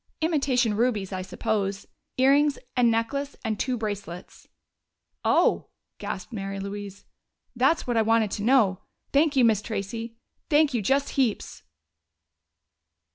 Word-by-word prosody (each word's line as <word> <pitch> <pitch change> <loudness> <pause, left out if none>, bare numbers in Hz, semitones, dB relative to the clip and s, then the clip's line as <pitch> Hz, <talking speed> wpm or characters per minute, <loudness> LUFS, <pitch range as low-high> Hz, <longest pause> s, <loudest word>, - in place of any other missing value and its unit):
Imitation 275 -8 +1
rubies, 215 -4 0
I 185 - -3
suppose. 195 +1 -2 0.3
Earrings 280 +2 +4 0.2
and 245 -2 +4
necklace 275 +5 -1
and 215 -2 -2
two 255 -2 -1
bracelets." 205 -5 -6 0.8
"Oh!" - - +2 0.3
gasped 190 +5 -6
Mary 195 -2 -4
Louise. 200 0 -7 0.5
"That's 265 +7 +2
what 240 -2 -1
I - - +5
want 220 -1 +2
to - - -3
know. 215 -5 +3 0.3
Thank 290 +1 +3
you, 255 -3 +5
Miss 220 -3 +3
Tracey, 225 +2 -5 0.3
thank 300 -2 +4
you 235 - 0
just 275 +7 +1
heaps!" 245 - -1
230 Hz, 130 wpm, -26 LUFS, 205-270 Hz, 0.8 s, I